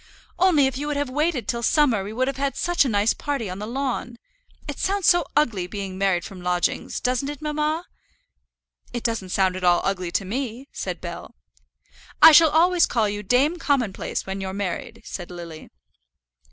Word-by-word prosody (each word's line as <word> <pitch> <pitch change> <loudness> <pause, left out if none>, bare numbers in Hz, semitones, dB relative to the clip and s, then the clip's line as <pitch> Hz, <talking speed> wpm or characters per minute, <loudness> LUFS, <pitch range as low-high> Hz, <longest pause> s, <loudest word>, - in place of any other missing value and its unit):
"Only 350 -7 +5
if 265 0 -2
you 295 - -3
would 295 -1 -1
have 285 -2 -2
waited 300 -2 0
till 235 - -1
summer 235 -5 +3
we 200 - -6
would 255 +4 0
have 275 -1 -3
had 275 0 -2
such 350 -3 +2
a 270 - -1
nice 205 0 +2
party 275 -9 -3
on 185 - -6
the 210 - -5
lawn. 245 -1 -3 0.5
It - - -6
sounds 395 -1 0
so 350 -1 +5
ugly, 220 -12 +1
being 195 0 -5
married 190 -3 +1
from 190 -2 -9
lodgings; 180 0 -1
doesn't 255 +2 -1
it, 290 -2 -6
mamma?" 305 +2 -1 1.1
"It 240 - -4
doesn't 225 -5 -2
sound 185 0 +1
at 185 - -7
all 175 -1 +5
ugly 185 -3 -1
to 195 - 0
me," 250 +4 -4
said - - -5
Bell. - - -8 0.8
"I - - +10
shall 320 +1 +7
always 345 +3 +4
call 225 -3 +1
you 205 0 -3
Dame 270 - +2
Commonplace 255 -11 -1
when 195 0 -4
you're 190 0 -4
married," 200 -3 -4
said 175 -2 -7
Lily. 170 -3 -9
240 Hz, 190 wpm, -23 LUFS, 195-290 Hz, 1.1 s, I